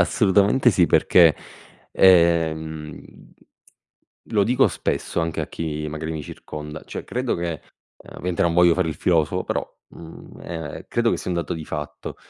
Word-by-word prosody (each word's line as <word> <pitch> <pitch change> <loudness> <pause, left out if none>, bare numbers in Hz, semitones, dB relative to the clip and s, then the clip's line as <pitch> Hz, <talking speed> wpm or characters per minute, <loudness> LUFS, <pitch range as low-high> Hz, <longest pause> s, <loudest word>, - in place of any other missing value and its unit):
assolutamente 105 +4 +3
sì 90 -4 +3
perché, 80 0 +5 0.6
ehm, 80 -4 +2 1.3
lo 105 -2 +2
dico 125 +2 +3
spesso - - -2
anche 80 0 -2
a - - -3
chi 75 -2 -4
magari 80 +1 -5
mi 80 - -5
circonda, 75 +1 -9
cioè - - -7
credo 125 0 -2
che, 85 -4 -4 0.4
ehm, - - -13
ovviamente 90 -1 -1
non 85 - +2
voglio 85 -1 +5
fare 90 -2 0
il 80 - -3
filosofo, 80 -2 0
però, - - -2 0.2
mhmm, 80 -1 -13
ehm, 80 -4 -7
credo 120 0 +1
che - - 0
sia - - -5
un 90 - -1
dato 85 - -2
di 80 -1 -7
fatto. 75 -1 -6
85 Hz, 160 wpm, -22 LUFS, 80-90 Hz, 1.3 s, perché